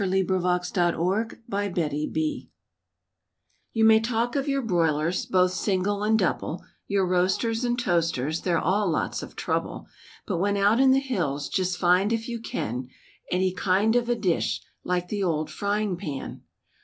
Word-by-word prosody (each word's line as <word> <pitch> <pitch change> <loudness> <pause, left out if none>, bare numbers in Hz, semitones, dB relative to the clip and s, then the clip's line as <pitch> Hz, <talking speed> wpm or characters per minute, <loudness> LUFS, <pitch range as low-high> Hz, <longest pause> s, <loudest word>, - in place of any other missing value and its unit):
*THE 190 -1 +1
OLD 180 +2 0
FRYING 200 -3 -2
PAN* 165 - -1 1.2
You 225 -1 +2
may 220 0 +7
talk 230 +2 -1
of 275 0 0
your 275 -1 0
broilers, 170 -4 +1
both 185 -1 +3
single 200 +1 0
and 220 +1 +3
double, 180 -3 -1 0.2
Your 200 -1 +1
roasters 190 +6 +1
and 240 0 0
toasters, 165 - 0
they're 175 -2 +1
all 190 +4 +1
lots 160 - -1
of - - -10
trouble; - - -2 0.4
But 185 -5 -2
when 200 +2 +1
out 205 +4 +3
in 265 0 +6
the 265 +1 +5
hills, 175 - -2
just 185 -1 -1
find 180 +4 +3
if 225 0 -1
you 235 -1 -4
can, 125 - -4 0.4
Any 185 0 +1
kind 200 +4 +2
of 240 0 +1
a 240 - +3
dish 190 -7 0 0.2
like 180 0 -1
the 205 -1 -2
old 160 -4 -1
frying 205 -1 -1
pan. 145 -5 -6
190 Hz, 155 wpm, -26 LUFS, 175-220 Hz, 1.2 s, may